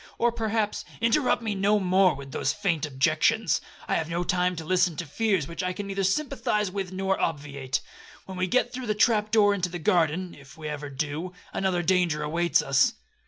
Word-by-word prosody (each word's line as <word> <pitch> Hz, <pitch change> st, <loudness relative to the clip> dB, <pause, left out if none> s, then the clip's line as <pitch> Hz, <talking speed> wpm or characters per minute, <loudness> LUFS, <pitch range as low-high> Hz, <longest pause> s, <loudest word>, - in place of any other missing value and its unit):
Or 240 Hz, 0 st, +2 dB
perhaps—' 220 Hz, -2 st, -1 dB, 0.2 s
'Interrupt 240 Hz, +1 st, +2 dB
me 220 Hz, -2 st, -1 dB
no 200 Hz, +2 st, +2 dB
more 185 Hz, 0 st, +3 dB
with 135 Hz, 0 st, -9 dB
those -, -, 0 dB
faint 175 Hz, -7 st, -1 dB
objections; 155 Hz, +9 st, +2 dB, 0.3 s
I -, -, 0 dB
have 160 Hz, -, -3 dB
no 170 Hz, +1 st, -1 dB
time 180 Hz, 0 st, +1 dB
to 160 Hz, -1 st, -6 dB
listen 180 Hz, -1 st, +2 dB
to 170 Hz, -, -4 dB
fears 190 Hz, 0 st, 0 dB
which 170 Hz, -, -5 dB
I 180 Hz, 0 st, -1 dB
can 200 Hz, +2 st, -5 dB
neither 195 Hz, 0 st, -2 dB
sympathise 210 Hz, -2 st, 0 dB
with 190 Hz, -1 st, -4 dB
or 195 Hz, 0 st, 0 dB
obviate. 140 Hz, -4 st, -2 dB, 0.4 s
When 190 Hz, -, -8 dB
we 185 Hz, 0 st, 0 dB
get 255 Hz, -, +1 dB
through 255 Hz, -1 st, -5 dB
the 215 Hz, -, 0 dB
trap 210 Hz, -1 st, +3 dB
door 210 Hz, -2 st, +4 dB
into 185 Hz, -3 st, -1 dB
the 175 Hz, -, -5 dB
garden, 175 Hz, +1 st, +1 dB
(if 140 Hz, +1 st, -15 dB
ever 150 Hz, -1 st, -5 dB
we 135 Hz, -, -12 dB
do), 150 Hz, +6 st, -3 dB, 0.2 s
another 185 Hz, -2 st, 0 dB
danger 175 Hz, -4 st, +2 dB
awaits 170 Hz, +3 st, +1 dB
us.' 135 Hz, -1 st, +3 dB
180 Hz, 200 wpm, -26 LUFS, 160-205 Hz, 0.4 s, door